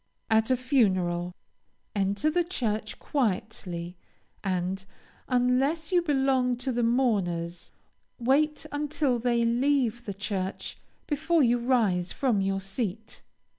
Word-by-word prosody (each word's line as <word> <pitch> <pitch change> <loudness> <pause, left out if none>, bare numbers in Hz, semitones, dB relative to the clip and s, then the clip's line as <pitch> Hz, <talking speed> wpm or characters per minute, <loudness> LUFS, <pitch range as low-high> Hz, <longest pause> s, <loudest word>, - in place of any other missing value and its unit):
At 220 +1 +4
a 255 - +3
funeral, 185 -9 +1 0.6
enter 200 +9 +1
the 350 +2 +2
church 220 - -2
quietly, 185 - -2 0.5
and, 190 0 -1 0.4
unless 260 +6 +1
you 355 -1 +4
belong 265 -5 +2
to 255 +2 -2
the 240 0 0
mourners, 195 -9 0 0.5
wait 295 +6 +2
until 290 -3 0
they 235 0 +2
leave 240 -1 +1
the 200 - -4
church 195 -2 -4 0.3
before 315 +1 +2
you 240 0 +3
rise 220 -8 +1
from 240 -7 +1
your 195 0 0
seat. 205 +2 -4
235 Hz, 115 wpm, -28 LUFS, 195-270 Hz, 0.6 s, At